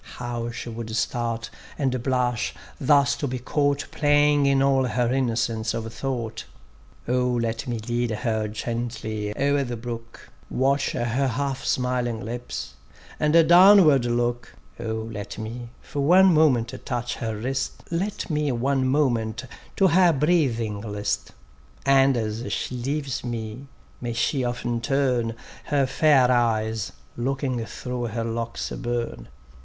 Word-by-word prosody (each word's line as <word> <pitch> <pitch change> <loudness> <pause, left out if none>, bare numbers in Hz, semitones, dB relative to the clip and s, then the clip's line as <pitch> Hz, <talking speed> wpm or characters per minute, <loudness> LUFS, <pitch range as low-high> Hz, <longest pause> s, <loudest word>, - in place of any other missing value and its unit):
How 120 -1 -3
she 120 +1 -6
would 115 -1 -6
start, 115 -1 -2 0.3
and 130 -3 0
blush, 125 -2 0 0.2
thus 140 -1 +4
to 145 - -2
be 130 0 -3
caught 145 +3 0
Playing 145 -1 +3
in 135 -1 +3
all 135 -1 +3
her 125 0 0
innocence 115 -3 0
of 115 0 -5
thought. 120 -5 -4 0.6
O 125 +1 +2
let 115 0 -1
me 120 -1 -2
lead 120 +2 -1
her 110 0 -1
gently 110 -1 -4
o'er 140 0 +2
the 120 -2 -4
brook, 115 0 -8 0.2
Watch 135 +2 +1
her 120 - -1
half 135 +2 -1
smiling 125 -2 0
lips, 120 - -5 0.5
and 155 +2 +4
downward 175 -7 +7
look; 120 0 -1 0.2
O 110 0 -3
let 105 -1 -6
me 115 +2 -6
for 145 - -6
one 180 +6 +6
moment 130 -7 +3
touch 120 -2 -3
her 110 -2 -3
wrist; 130 +5 -3
Let 195 +5 -2
me 150 -3 0
one 130 +2 +1
moment 120 -5 +1 0.3
to 190 -1 +4
her 180 0 +5
breathing 130 -9 +1
list; 105 -1 -3 0.6
And 135 -1 +5
as 110 -1 -3
she 115 - -2
leaves 135 +1 -3
me 120 +2 -5 0.3
may 120 -1 -3
she 130 +3 0
often 120 -1 -2
turn 125 -3 +1 0.3
Her 140 -2 +2
fair 135 -2 +4
eyes 110 -3 +1 0.2
looking 130 -1 -1
through 125 -1 -4
her 115 0 -3
locks 115 0 -3
aub├╣rne. 120 - -3
125 Hz, 140 wpm, -24 LUFS, 115-140 Hz, 0.6 s, downward